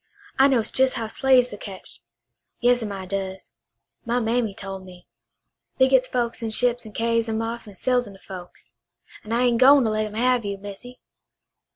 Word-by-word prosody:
I 270 Hz, -, +7 dB
knows 240 Hz, -5 st, +1 dB
jes' 265 Hz, 0 st, +4 dB
how 230 Hz, -3 st, -3 dB
slaves 255 Hz, -1 st, +3 dB
are -, -, -7 dB
ketched. 190 Hz, -, -9 dB, 0.6 s
Yas'm, 245 Hz, -3 st, +2 dB
I 190 Hz, -1 st, -6 dB
does. 190 Hz, -5 st, -5 dB, 0.5 s
My 240 Hz, +1 st, 0 dB
mammy 225 Hz, -3 st, 0 dB
tole 195 Hz, -1 st, -7 dB
me. 180 Hz, -1 st, -14 dB, 0.7 s
They 260 Hz, -, +5 dB
gits 260 Hz, -1 st, +3 dB
folks 240 Hz, -2 st, -2 dB
in 225 Hz, -, -2 dB
ships 245 Hz, +1 st, +1 dB
and 215 Hz, -, -13 dB
carries 230 Hz, 0 st, 0 dB
'em 220 Hz, 0 st, -1 dB
off 230 Hz, 0 st, -5 dB
an' 205 Hz, -, -12 dB
sells 245 Hz, +2 st, 0 dB
'em 200 Hz, -, -11 dB
to -, -, -17 dB
folks. 180 Hz, -2 st, -10 dB, 0.5 s
An' 215 Hz, -, -9 dB
I 235 Hz, +2 st, +2 dB
ain' 240 Hz, -2 st, +2 dB
gwine 275 Hz, +1 st, +7 dB
to 220 Hz, -, +1 dB
let 215 Hz, 0 st, 0 dB
'em 210 Hz, -, -10 dB
have 250 Hz, +1 st, +2 dB
you, 200 Hz, -1 st, -4 dB
Missy." 205 Hz, +6 st, -10 dB
230 Hz, 195 wpm, -24 LUFS, 200-245 Hz, 0.7 s, I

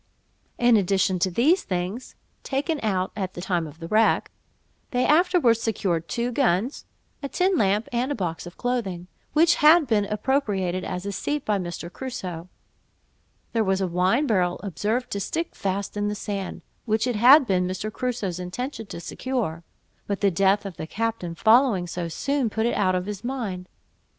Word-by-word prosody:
In 240 Hz, -2 st, +5 dB
addition 190 Hz, -1 st, +1 dB
to 185 Hz, -, +2 dB
these 290 Hz, -, +3 dB
things 185 Hz, +7 st, -4 dB, 0.3 s
(taken 290 Hz, +3 st, -1 dB
out 190 Hz, -4 st, 0 dB
at 190 Hz, -3 st, -4 dB
the -, -, -6 dB
time 175 Hz, -3 st, -1 dB
of 150 Hz, +1 st, -12 dB
the 165 Hz, 0 st, -7 dB
wreck), 220 Hz, +4 st, +2 dB, 0.6 s
they 250 Hz, 0 st, +1 dB
afterwards 310 Hz, -8 st, +4 dB
secured 185 Hz, -7 st, -1 dB
two 235 Hz, +9 st, -2 dB
guns, 240 Hz, -1 st, 0 dB, 0.4 s
a 280 Hz, -, -4 dB
tin 370 Hz, +5 st, +1 dB
lamp, 210 Hz, -, +2 dB
and 245 Hz, +3 st, 0 dB
a -, -, 0 dB
box 175 Hz, -4 st, -4 dB
of 175 Hz, -, -12 dB
clothing, 220 Hz, -8 st, -2 dB, 0.3 s
which 330 Hz, +3 st, +4 dB
had 310 Hz, +2 st, +7 dB
been 215 Hz, -5 st, +2 dB
appropriated 205 Hz, -5 st, -1 dB
as 180 Hz, +1 st, -4 dB
a 200 Hz, -, -2 dB
seat 290 Hz, +9 st, -3 dB
by 210 Hz, -2 st, +1 dB
Mr. 175 Hz, -1 st, -6 dB
Crusoe. 185 Hz, -10 st, -6 dB, 1.0 s
There 225 Hz, -1 st, +2 dB
was 190 Hz, -1 st, +1 dB
a 190 Hz, -, +1 dB
wine 185 Hz, -, +2 dB
barrel 185 Hz, -8 st, +1 dB
observed 210 Hz, +7 st, -2 dB
to 200 Hz, -, -2 dB
stick 330 Hz, -, -3 dB
fast 195 Hz, +1 st, -3 dB
in 205 Hz, 0 st, -1 dB
the 210 Hz, -, -2 dB
sand, 200 Hz, -2 st, -5 dB, 0.2 s
which 220 Hz, 0 st, +1 dB
it 245 Hz, -4 st, -1 dB
had 265 Hz, +6 st, +8 dB
been 180 Hz, -4 st, +1 dB
Mr. 190 Hz, +4 st, -4 dB
Crusoe's 230 Hz, -8 st, -3 dB
intention 225 Hz, +6 st, -5 dB
to 170 Hz, -, -7 dB
secure; 175 Hz, -3 st, -3 dB, 0.4 s
but 200 Hz, -1 st, -2 dB
the 200 Hz, -1 st, +3 dB
death 195 Hz, +3 st, +2 dB
of 190 Hz, -4 st, -7 dB
the 160 Hz, -, -5 dB
captain 220 Hz, -5 st, -3 dB
following 225 Hz, -3 st, +4 dB
so 175 Hz, 0 st, -4 dB
soon, 275 Hz, -, -1 dB
put 220 Hz, +1 st, -1 dB
it 240 Hz, -, +1 dB
out 185 Hz, -2 st, +2 dB
of 180 Hz, 0 st, -1 dB
his 205 Hz, +1 st, -6 dB
mind. 220 Hz, -8 st, -4 dB
205 Hz, 180 wpm, -25 LUFS, 185-245 Hz, 1.0 s, had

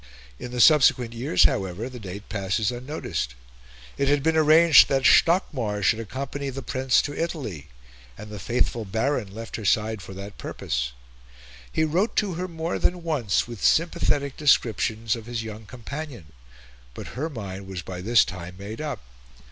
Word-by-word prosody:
In -, -, -6 dB
the 125 Hz, 0 st, -5 dB
subsequent 125 Hz, -4 st, +5 dB
years, 115 Hz, -6 st, +2 dB
however, 95 Hz, +4 st, +1 dB
the 125 Hz, -1 st, -9 dB
date 100 Hz, 0 st, -8 dB
passes 100 Hz, +2 st, -1 dB
unnoticed. 125 Hz, -, -4 dB, 0.6 s
It 140 Hz, -, +2 dB
had 145 Hz, 0 st, +2 dB
been 160 Hz, 0 st, +2 dB
arranged 160 Hz, 0 st, +7 dB
that 135 Hz, -1 st, +1 dB
Stockmar 125 Hz, -, +3 dB
should 110 Hz, +4 st, +3 dB
accompany 135 Hz, +5 st, -5 dB
the 135 Hz, 0 st, -6 dB
Prince 130 Hz, +2 st, +2 dB
to 145 Hz, -, -4 dB
Italy, 135 Hz, -, -4 dB, 0.5 s
and 105 Hz, +1 st, -10 dB
the 105 Hz, -, -7 dB
faithful 115 Hz, +4 st, -1 dB
Baron 110 Hz, +1 st, -1 dB
left 115 Hz, +3 st, -7 dB
her 110 Hz, -, -7 dB
side 110 Hz, +1 st, +1 dB
for 95 Hz, +1 st, -10 dB
that 100 Hz, +1 st, -9 dB
purpose. -, -, -3 dB, 0.8 s
He -, -, +1 dB
wrote 175 Hz, +8 st, 0 dB
to 205 Hz, -4 st, +1 dB
her 180 Hz, +2 st, -3 dB
more 165 Hz, -1 st, -3 dB
than 175 Hz, -1 st, 0 dB
once 135 Hz, -14 st, 0 dB
with 120 Hz, -4 st, -8 dB
sympathetic 145 Hz, -4 st, +2 dB
descriptions 115 Hz, -5 st, +2 dB
of 115 Hz, -1 st, -10 dB
his 120 Hz, -2 st, -3 dB
young 110 Hz, -1 st, -8 dB
companion; 125 Hz, -, -8 dB, 0.6 s
but -, -, -7 dB
her 150 Hz, +6 st, -4 dB
mind 100 Hz, -7 st, -7 dB
was 95 Hz, -2 st, -6 dB
by 90 Hz, 0 st, -7 dB
this 115 Hz, +3 st, +4 dB
time 90 Hz, 0 st, -8 dB
made 105 Hz, +6 st, -7 dB
up. 145 Hz, -6 st, -4 dB
120 Hz, 165 wpm, -25 LUFS, 100-145 Hz, 0.8 s, arranged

